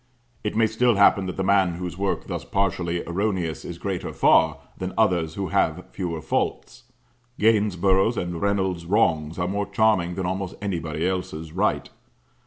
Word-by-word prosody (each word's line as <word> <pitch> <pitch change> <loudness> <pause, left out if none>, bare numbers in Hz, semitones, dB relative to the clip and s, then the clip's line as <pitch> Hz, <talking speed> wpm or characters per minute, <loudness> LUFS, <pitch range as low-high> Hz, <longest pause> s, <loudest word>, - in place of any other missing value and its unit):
It 105 - -2
may 115 0 +4
still 115 +2 +2
happen 100 -1 +4
that 90 - -5
the 95 - 0
man 95 -2 +3
whose 90 0 -5
work 100 +1 -2
thus - - -4
partially 85 -3 -1
erroneous 90 -3 -2
is 85 - -7
greater 95 -1 -4
far, - - +4 0.2
than 95 0 -5
others 90 -8 +2
who 100 -2 -3
have 90 -3 0
fewer 85 -4 -4
faults. - - -2 0.5
Gainsborough's 100 -1 +3
and 85 -1 -3
Reynolds' 95 -4 0
wrongs 80 -6 +1
are 90 -1 -1
more 100 +2 -2
charming 100 -4 +2
than 95 - -3
almost 95 +1 -3
anybody 85 -5 -2
else's 80 -4 -4
right. 100 +6 0
95 Hz, 160 wpm, -24 LUFS, 85-100 Hz, 0.5 s, may